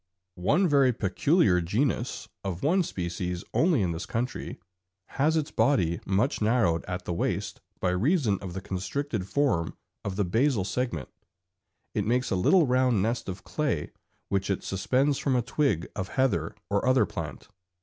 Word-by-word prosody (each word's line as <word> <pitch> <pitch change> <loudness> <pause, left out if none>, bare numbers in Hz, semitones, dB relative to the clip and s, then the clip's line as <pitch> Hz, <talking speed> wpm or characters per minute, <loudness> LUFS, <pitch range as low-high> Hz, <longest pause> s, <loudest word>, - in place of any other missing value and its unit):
One 180 - +3
very 140 -4 +4
peculiar 105 - +2
genus, 120 - -1 0.2
of 95 -3 -4
one 175 +7 +3
species 90 - -3
only 160 - +3
in 90 - 0
this 80 - -5
country, 120 +3 -3 0.5
has 155 +4 +1
its 150 -2 -1
body 85 - +2
much 105 +8 +1
narrowed 105 -7 +2
at 90 0 -5
the 85 - -2
waist 85 - -2 0.2
by 90 - +1
reason 110 - +2
of 95 -3 -6
the 95 - -4
constricted 95 +4 -3
form 95 - 0 0.3
of 100 -2 -3
the 100 0 +1
basal 115 +2 +2
segment; 100 - -2 0.8
it 105 - 0
makes 125 +2 +1
a - - +2
little 160 - +4
round 125 -5 +2
nest 115 -1 -1
of 95 0 -6
clay 145 - -2 0.4
which 100 0 0
it 95 - -1
suspends 130 +9 +1
from 135 -3 +1
a 125 - +2
twig 115 - 0
of 95 -2 -3
heather 105 - 0
or 100 0 0
other 130 0 +5
plant. 75 -6 -6
105 Hz, 160 wpm, -27 LUFS, 90-135 Hz, 0.8 s, other